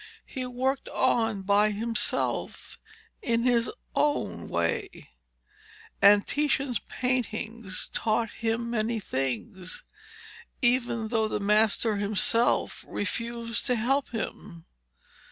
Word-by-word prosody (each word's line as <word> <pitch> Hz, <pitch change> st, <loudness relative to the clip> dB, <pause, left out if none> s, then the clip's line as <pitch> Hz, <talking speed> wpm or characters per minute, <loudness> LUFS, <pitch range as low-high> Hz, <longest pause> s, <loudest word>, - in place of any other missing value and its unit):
He 255 Hz, -2 st, -5 dB
worked 260 Hz, +2 st, -1 dB
on 225 Hz, -6 st, +1 dB
by 205 Hz, +2 st, +4 dB
himself 230 Hz, +3 st, -2 dB, 0.4 s
in 235 Hz, -, +1 dB
his 240 Hz, -1 st, +3 dB, 0.3 s
own 295 Hz, 0 st, 0 dB
way, 85 Hz, -1 st, -2 dB, 0.9 s
and 200 Hz, +1 st, +7 dB
Titian's 280 Hz, -5 st, 0 dB
paintings 235 Hz, -5 st, -2 dB
taught 225 Hz, 0 st, +1 dB
him 230 Hz, +1 st, -2 dB
many 225 Hz, 0 st, 0 dB
things 180 Hz, -, -3 dB, 0.8 s
even 240 Hz, -3 st, +1 dB
though 220 Hz, -2 st, +2 dB
the 215 Hz, -, -2 dB
master 210 Hz, +1 st, +3 dB
himself 215 Hz, +3 st, +2 dB
refused 230 Hz, +2 st, -3 dB
to 250 Hz, -, +3 dB
help 265 Hz, +5 st, +1 dB
him. 205 Hz, -6 st, -6 dB
230 Hz, 100 wpm, -28 LUFS, 205-240 Hz, 0.9 s, and